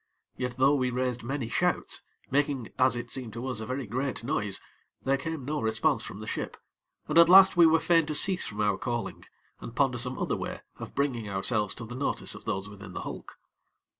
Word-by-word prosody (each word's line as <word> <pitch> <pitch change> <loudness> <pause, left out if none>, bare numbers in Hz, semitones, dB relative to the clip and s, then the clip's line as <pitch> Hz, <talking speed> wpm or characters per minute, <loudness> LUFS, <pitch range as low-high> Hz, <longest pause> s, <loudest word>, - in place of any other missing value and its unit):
Yet 125 -1 -4
though 135 +2 +4
we 130 -3 +1
raised 125 0 -2
many 130 0 -3
shouts, 115 - 0 0.3
making 140 -4 0
as 130 -1 +4
it 120 0 -6
seemed 125 -5 -3
to 115 +3 -6
us 130 -4 -2
a 110 - -5
very 130 +1 -3
great 125 +3 -3
noise, 105 -7 -1 0.4
there 135 +1 +2
came 155 -1 -5
no 150 +2 -2
response 110 0 +1
from - - -8
the - - -7
ship, - - -4 0.5
and - - +4
at 170 0 +7
last 190 +1 +8
we 170 -1 +7
were 160 +1 +4
fain 165 -1 +3
to 155 - -2
cease 190 +3 +5
from 105 0 -4
our 105 -2 +1
calling, 120 -2 -4 0.3
and 115 - -9
ponder 130 -3 +1
some 125 +2 +1
other - - -1
way - - -5 0.2
of - - -9
bringing 125 -7 -1
ourselves 105 +2 +1
to 115 - -7
the 120 - -9
notice 135 +3 -1
of - - -10
those 95 +1 -2
within 100 -2 -11
the - - -5
hulk. - - -8
125 Hz, 215 wpm, -28 LUFS, 115-140 Hz, 0.5 s, last